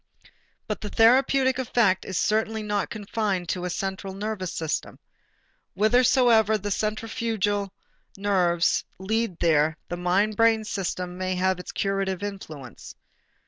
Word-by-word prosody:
But 215 Hz, -, -4 dB
the 210 Hz, -, -5 dB
therapeutic 260 Hz, +4 st, +4 dB
effect 230 Hz, -6 st, +2 dB
is 190 Hz, -, -3 dB
certainly 220 Hz, +1 st, 0 dB
not 205 Hz, -1 st, -1 dB
confined 205 Hz, -4 st, -2 dB
to 180 Hz, -, -1 dB
the 180 Hz, -, -3 dB
central 190 Hz, +1 st, -4 dB
nervous 200 Hz, -3 st, -3 dB
system. 160 Hz, -2 st, -3 dB, 0.8 s
Whithersoever 225 Hz, 0 st, +4 dB
the 205 Hz, 0 st, -5 dB
centrifugal 215 Hz, -2 st, -1 dB, 0.5 s
nerves 180 Hz, -4 st, +2 dB
lead 215 Hz, 0 st, -1 dB
there 155 Hz, -2 st, +2 dB
the 175 Hz, -, -3 dB
mind 195 Hz, +4 st, +1 dB
brain 225 Hz, -1 st, +4 dB
system 185 Hz, -3 st, -4 dB
may 185 Hz, 0 st, -1 dB
have 185 Hz, 0 st, +1 dB
its 180 Hz, -, -7 dB
curative 195 Hz, -1 st, -1 dB
influence. 155 Hz, -, -8 dB
200 Hz, 125 wpm, -25 LUFS, 185-220 Hz, 0.8 s, therapeutic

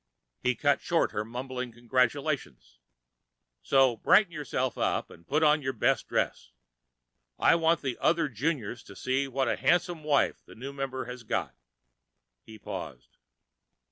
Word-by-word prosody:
He 125 Hz, 0 st, +1 dB
cut 145 Hz, +4 st, +2 dB
short 170 Hz, -1 st, +1 dB
her 105 Hz, -, -2 dB
mumbled 125 Hz, +1 st, -5 dB
congratulations. 120 Hz, -, -1 dB, 0.8 s
"So 130 Hz, -, +3 dB
brighten 195 Hz, -, +4 dB
yourself 130 Hz, -5 st, -2 dB
up -, -, -1 dB
and 85 Hz, +1 st, -16 dB
put 155 Hz, +2 st, +1 dB
on 150 Hz, 0 st, +4 dB
your 130 Hz, -1 st, -2 dB
best 110 Hz, -, +1 dB
dress. -, -, -1 dB, 0.9 s
I -, -, +5 dB
want 165 Hz, 0 st, +2 dB
the 130 Hz, -3 st, -3 dB
other 165 Hz, -1 st, +2 dB
Juniors 125 Hz, -3 st, -2 dB
to -, -, -12 dB
see 130 Hz, +2 st, 0 dB
what 135 Hz, 0 st, -1 dB
a -, -, +1 dB
handsome 175 Hz, -2 st, +1 dB
wife 150 Hz, -2 st, +1 dB
the -, -, -15 dB
new 135 Hz, +5 st, -7 dB
member 135 Hz, -2 st, -4 dB
has 125 Hz, 0 st, -7 dB
got." 110 Hz, -, -2 dB, 0.9 s
He 110 Hz, -, -13 dB
paused. 90 Hz, -, -8 dB
130 Hz, 145 wpm, -29 LUFS, 120-150 Hz, 0.9 s, I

